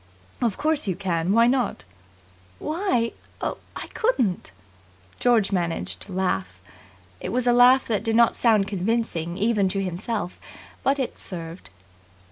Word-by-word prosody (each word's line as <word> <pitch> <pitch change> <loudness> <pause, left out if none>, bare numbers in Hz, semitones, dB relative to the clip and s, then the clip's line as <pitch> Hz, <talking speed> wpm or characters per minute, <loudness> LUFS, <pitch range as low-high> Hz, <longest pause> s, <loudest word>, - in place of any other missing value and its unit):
"Of 230 -5 0
course 305 -3 0
you 185 - 0
can. 180 -2 -1
Why 230 +3 +5
not?" 245 - 0 0.7
"Why 305 - 0 0.3
oh, - - -3 0.2
I - - -5
couldn't!" 245 - 0 0.7
George 235 -5 +3
managed 175 -3 -1
to 205 - -3
laugh. 95 - -2 0.6
It - - -4
was 250 +1 0
a 245 - +4
laugh 250 +2 +6
that 215 -2 0
did 225 -1 +1
not 235 0 +5
sound 215 -4 +3
convincing 190 -4 -1
even 205 -2 +2
to 195 +1 -1
himself, 185 +1 -3 0.4
but 275 +1 +2
it 265 -3 -3
served. 165 - -5
215 Hz, 140 wpm, -24 LUFS, 180-245 Hz, 0.7 s, laugh